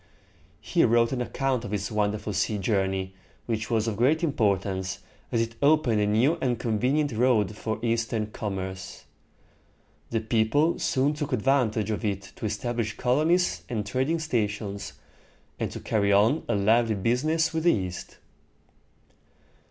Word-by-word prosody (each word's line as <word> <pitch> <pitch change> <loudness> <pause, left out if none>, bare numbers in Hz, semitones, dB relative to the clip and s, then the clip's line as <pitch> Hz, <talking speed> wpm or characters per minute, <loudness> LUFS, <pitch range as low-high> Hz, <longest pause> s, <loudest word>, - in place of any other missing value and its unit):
He - - +2
wrote 115 0 +3
an 130 -2 -1
account 130 0 -1
of - - -6
this 100 0 -3
wonderful 105 0 -1
sea 105 +2 0
journey, 95 -1 -1 0.3
which 110 -2 -2
was 115 -1 +1
of 110 -3 -2
great 145 +8 +2
importance, 100 - 0 0.3
as 115 - +2
it 115 0 -2
opened 140 -7 +3
a 105 - +2
new 125 +11 +2
and 125 -2 +1
convenient 125 +6 0
road 110 -3 +2
for 110 +1 -3
Eastern 115 -1 0
commerce. 95 -3 -5 1.1
The 115 - 0
people 115 +8 +1
soon 135 +3 +1
took 150 -1 -4
advantage 115 -4 +1
of 105 - -3
it 100 -2 -3
to 110 - -3
establish 115 +1 -3
colonies 155 +8 +2
and 110 -4 -2
trading 130 +10 0
stations, 105 -8 -2 0.7
and - - -1
to - - -7
carry 100 -2 +1
on 110 +10 +3
a - - +2
lively 110 +2 +3
business 150 - +1
with 160 0 -2
the 175 - +6
East. 90 -3 -5
115 Hz, 145 wpm, -26 LUFS, 105-130 Hz, 1.1 s, the